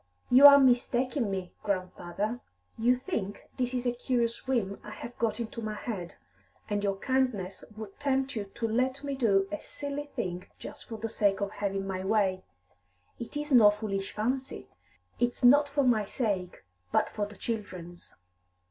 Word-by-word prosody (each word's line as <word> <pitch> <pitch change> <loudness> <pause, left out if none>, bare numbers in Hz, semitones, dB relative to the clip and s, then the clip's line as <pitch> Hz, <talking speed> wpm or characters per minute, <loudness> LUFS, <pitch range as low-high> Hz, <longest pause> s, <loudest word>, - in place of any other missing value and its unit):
"You 265 +3 +11
are 280 0 +10
mistaking 250 -1 +2
me, 190 -2 -4
grandfather. 195 +3 -3 0.4
You 240 +3 +3
think 220 - -4
this 250 -1 -1
a 245 - +3
curious 240 -1 -1
whim 220 -7 0
I - - -9
have 235 +3 -8
got 225 -1 0
into 230 0 -5
my 215 -1 -3
head, 195 -6 -5 0.5
and 205 -1 -1
your 200 -1 +1
kindness 215 -5 -1
would 215 -3 -9
tempt 270 -1 0
you 210 -2 -2
to 230 - -1
let 255 +5 0
me 280 -1 -2
do 200 -7 +2
a 205 - -3
silly 285 0 -5
thing 180 0 -3
just - - -9
for 225 - -6
the 225 +1 -3
sake 200 -3 +1
of 200 -1 -2
having 195 -1 -2
my 190 -1 -3
way. 195 -2 +1 0.8
It 235 +5 -6
is 295 0 -4
no 230 -5 +8
foolish 205 -2 -3
fancy. 250 - -3 0.5
It's 240 +2 0
not 285 +4 +6
for 280 0 +1
my 230 -5 +3
sake, 195 -5 -2 0.3
but - - +3
for 205 -1 -2
the 205 -1 -13
children's." 180 -6 -6
220 Hz, 165 wpm, -29 LUFS, 195-255 Hz, 0.8 s, You